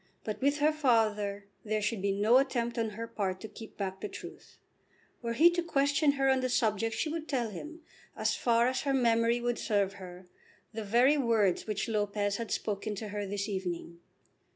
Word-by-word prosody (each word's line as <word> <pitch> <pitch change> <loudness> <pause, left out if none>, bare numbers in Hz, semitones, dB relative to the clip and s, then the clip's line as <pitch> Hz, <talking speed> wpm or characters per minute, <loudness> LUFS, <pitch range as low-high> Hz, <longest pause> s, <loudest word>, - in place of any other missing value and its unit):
But 215 +3 -5
with 285 +2 +2
her 305 +1 +3
father 215 -8 +1 0.2
there 215 0 -1
should 210 -1 -2
be 200 0 +1
no 210 +6 +4
attempt 240 -3 -1
on 225 -1 0
her 230 - -3
part 195 -5 -3
to 220 - -6
keep 225 0 -12
back 190 -1 -4
the 210 - -3
truth. - - -11 0.6
Were 235 -1 -2
he 330 +8 +6
to 345 0 0
question 285 -2 +2
her 270 -1 +1
on 265 -1 +4
the 255 0 -1
subject 225 -2 +1
she - - -1
would 320 0 -4
tell 240 -6 -1
him, 310 - -8 0.4
as - - +1
far 235 0 +3
as 260 0 0
her 275 -1 0
memory 235 -1 +3
would 240 0 -1
serve 200 -3 +1
her, 180 0 -10 0.5
the 220 0 -4
very 245 +8 +4
words 225 -8 +2
which 210 +1 -2
Lopez 205 -2 0
had 230 -1 -5
spoken 210 0 -2
to 210 +1 -6
her 205 0 -4
this 200 +1 -3
evening. 175 -4 -4
225 Hz, 200 wpm, -30 LUFS, 205-260 Hz, 0.6 s, he